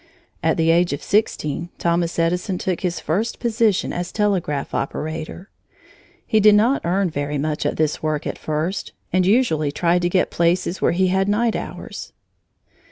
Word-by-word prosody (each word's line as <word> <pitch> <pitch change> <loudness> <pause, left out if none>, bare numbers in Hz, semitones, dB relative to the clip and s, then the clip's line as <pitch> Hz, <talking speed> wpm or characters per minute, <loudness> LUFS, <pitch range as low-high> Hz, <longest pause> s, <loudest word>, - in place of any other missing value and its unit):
At - - +1
the 165 0 +3
age 170 -1 +3
of 140 - -5
sixteen, 175 -6 0
Thomas 170 0 0
Edison 180 +3 0
took 185 -1 -2
his 175 -2 -1
first 205 +10 -2
position 225 -4 +1
as 175 0 -4
telegraph 190 -9 -1
operator. 160 +6 -4 0.7
He 220 - +2
did 210 0 +6
not 235 +7 +3
earn 180 +1 +1
very 145 0 -2
much 150 +1 -1
at - - -2
this 155 -1 0
work, 155 -2 -1
at - - -4
first, 155 +5 -3 0.2
and 185 0 +3
usually 190 - +2
tried 175 +4 +1
to 175 - +1
get 185 +1 +1
places 170 +2 0
where - - +3
he 185 +1 +2
had 190 +2 +1
night 225 +2 +1
hours. - - -7
175 Hz, 165 wpm, -21 LUFS, 160-200 Hz, 0.7 s, did